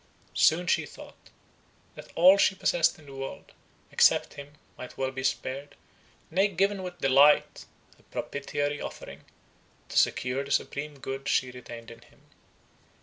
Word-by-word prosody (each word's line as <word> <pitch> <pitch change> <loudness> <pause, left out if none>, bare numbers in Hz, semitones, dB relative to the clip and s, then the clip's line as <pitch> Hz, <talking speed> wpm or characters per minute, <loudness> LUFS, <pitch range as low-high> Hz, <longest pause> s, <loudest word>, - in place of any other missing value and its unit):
—Soon 170 +4 +3
she - - +1
thought, - - -14 0.6
that - - -12
all 180 +3 +7
she 195 -1 +3
possessed 170 -2 +1
in 155 - -17
the 140 - -12
world, 135 0 -8 0.4
except - - +3
him, 140 0 -11 0.2
might 125 - -10
well 130 0 -1
be 130 0 -6
spared, 135 +2 -3 0.6
nay, 190 +5 +3
given 195 +1 0
with 180 -1 -7
delight, 140 +2 +4 0.3
a - - -23
propitiatory 145 +1 -3
offering, - - -8 0.7
to - - +3
secure 130 +2 0
the 140 - -11
supreme 145 +1 -2
good 135 0 -5
she 130 - +1
retained 120 -2 -10
in 115 - -13
him. - - -23
140 Hz, 145 wpm, -27 LUFS, 135-170 Hz, 0.7 s, all